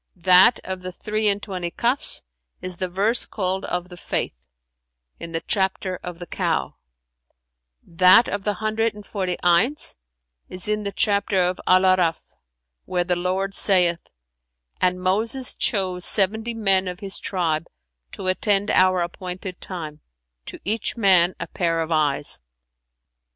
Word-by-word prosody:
'[FN#387] 170 Hz, -, -27 dB
that 185 Hz, +5 st, +6 dB
of 190 Hz, -1 st, -6 dB
the 185 Hz, 0 st, -6 dB
three 215 Hz, +3 st, -2 dB
and 205 Hz, 0 st, +1 dB
twenty 180 Hz, -4 st, -4 dB
Kafs 245 Hz, -, +1 dB, 0.4 s
is 185 Hz, -1 st, -6 dB
the 185 Hz, +1 st, -3 dB
verse 205 Hz, +7 st, +1 dB
called 190 Hz, -1 st, -3 dB
of 180 Hz, 0 st, -4 dB
the 180 Hz, -, -10 dB
Faith, 65 Hz, -, -4 dB, 0.7 s
in 170 Hz, -, -8 dB
the 165 Hz, 0 st, -3 dB
chapter 190 Hz, -1 st, -1 dB
of 180 Hz, -2 st, -7 dB
The 175 Hz, -, -8 dB
Cow; -, -, -2 dB, 1.1 s
that 185 Hz, +7 st, +5 dB
of 205 Hz, -1 st, -4 dB
the 210 Hz, 0 st, -1 dB
hundred 220 Hz, +2 st, -1 dB
and 210 Hz, -1 st, -11 dB
forty 185 Hz, -4 st, -3 dB
Ayns 175 Hz, -, +2 dB, 0.5 s
is 185 Hz, +1 st, -4 dB
in 210 Hz, 0 st, 0 dB
the 200 Hz, -1 st, -4 dB
chapter 200 Hz, -1 st, 0 dB
of 180 Hz, 0 st, 0 dB
Al 185 Hz, +1 st, +5 dB
A'arαf,[FN#388] 180 Hz, -3 st, +3 dB, 0.7 s
where 180 Hz, -1 st, -1 dB
the 180 Hz, 0 st, 0 dB
Lord 185 Hz, +2 st, -2 dB
saith, 180 Hz, -4 st, +4 dB, 0.7 s
'And 180 Hz, 0 st, +1 dB
Moses 225 Hz, +7 st, +1 dB
chose 185 Hz, -5 st, 0 dB
seventy 220 Hz, +5 st, +2 dB
men 195 Hz, -4 st, +1 dB
of 180 Hz, 0 st, -6 dB
his 195 Hz, -1 st, -2 dB
tribe 165 Hz, -4 st, -2 dB, 0.5 s
to -, -, -7 dB
attend 200 Hz, +2 st, +1 dB
our 185 Hz, -1 st, +4 dB
appointed 180 Hz, +1 st, -7 dB
time;[FN#389] 155 Hz, -5 st, -7 dB, 0.5 s
to -, -, -7 dB
each 220 Hz, +4 st, -1 dB
man 185 Hz, -4 st, +4 dB
a 170 Hz, -, -3 dB
pair 170 Hz, -1 st, -1 dB
of 165 Hz, 0 st, -3 dB
eyes.' 145 Hz, -, 0 dB
185 Hz, 150 wpm, -22 LUFS, 175-205 Hz, 1.1 s, that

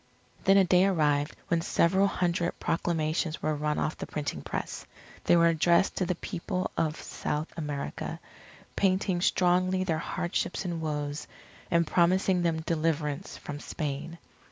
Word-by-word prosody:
Then 195 Hz, 0 st, +6 dB
a 195 Hz, -, +7 dB
day 180 Hz, +1 st, +4 dB
arrived 150 Hz, -5 st, +1 dB
when 170 Hz, -1 st, +2 dB
several 190 Hz, +4 st, +3 dB
hundred 175 Hz, -2 st, -1 dB
proclamations 165 Hz, -1 st, -1 dB
were 155 Hz, -, +1 dB
run 150 Hz, 0 st, -1 dB
off 155 Hz, -, -1 dB
the -, -, -5 dB
printing 150 Hz, -1 st, -3 dB
press. -, -, -4 dB, 0.4 s
They -, -, +5 dB
were 170 Hz, 0 st, +5 dB
addressed 170 Hz, +3 st, +3 dB
to 185 Hz, -, 0 dB
the 180 Hz, -, 0 dB
People 185 Hz, +2 st, -3 dB
of 155 Hz, -1 st, 0 dB
South 150 Hz, +2 st, -4 dB
America, 145 Hz, -, -4 dB, 0.6 s
painting 185 Hz, -2 st, +1 dB
strongly 185 Hz, +1 st, +2 dB
their 165 Hz, -4 st, 0 dB
hardships 175 Hz, +2 st, -2 dB
and 170 Hz, -2 st, -3 dB
woes, 150 Hz, -1 st, -3 dB, 0.4 s
and 170 Hz, 0 st, +3 dB
promising 180 Hz, +2 st, +3 dB
them 165 Hz, -2 st, 0 dB
deliverance 155 Hz, -3 st, -1 dB
from 145 Hz, 0 st, -7 dB
Spain. 150 Hz, +3 st, -4 dB
170 Hz, 145 wpm, -29 LUFS, 155-180 Hz, 0.6 s, a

